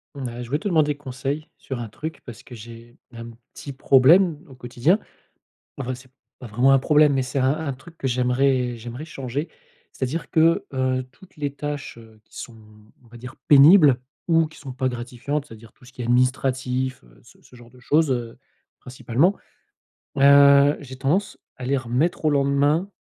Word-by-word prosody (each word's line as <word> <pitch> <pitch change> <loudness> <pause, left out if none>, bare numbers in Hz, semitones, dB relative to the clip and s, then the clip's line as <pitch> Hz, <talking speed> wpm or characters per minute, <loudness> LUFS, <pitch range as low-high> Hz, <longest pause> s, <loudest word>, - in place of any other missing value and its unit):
Mmh 140 - -7
bah, 120 0 -6
je 120 - -7
voulais 145 - 0
te 210 - -4
demander 155 -5 +2
des - - -18
conseils, 140 +2 -5
sur 130 -3 -7
un 120 - -5
truc 160 +9 -8
parce 120 -3 -10
que 125 - -13
j'ai 115 +1 -13
un 115 0 -9 0.2
petit 140 - -9
problème 150 +6 +4
au 135 - -14
quotidien. 125 - 0 0.8
Enfin, 130 -1 -4
c'est 130 +1 -15 0.3
pas 125 - -10
vraiment 125 +5 +2
un 135 - +5
problème, 150 +1 +3
mais 135 - +1
c'est 130 +2 -4
un 130 0 +2
un 155 -3 -4
truc 165 +6 -15
que 135 - -5
j'aimerais 125 0 0
j'aimerais 120 +6 -8
changer. 140 +1 -5 0.4
C'est-à-dire 135 +6 -4
que, 165 +1 +2
heu, 130 0 0
toutes 190 +4 -20
les 145 -2 -3
tâches, 145 -2 -6
heu, 110 -1 -17
qui - - -21
sont, 120 - -9 0.5
on - - -23
va 120 +1 -15
dire 125 +2 -11
«pénibles» 145 -2 +7 0.3
ou 165 -1 +3
qui 160 - -17
sont 135 -3 -9
pas 130 +1 -1
gratifiantes 125 +4 -4
c'est-à-dire 115 -3 -14
tout - - -23
ce 125 - -16
qui 125 - -8
est - - -4
administratif, 130 +1 0
heu, - - -22
ce - - -21
ce 125 - -19
genre 120 -1 -16
de 125 - -20
chose, 150 +4 +1
heu, 120 -2 -3 0.4
principalement, 130 - 0 0.8
heu, 140 +1 +6
j'ai 130 -2 -10
tendance 165 +10 -1 0.2
à 125 - -8
les 140 +2 0
remettre 130 +7 -2
au 155 - +4
lendemain 145 +5 +1
130 Hz, 195 wpm, -22 LUFS, 125-145 Hz, 0.8 s, pénibles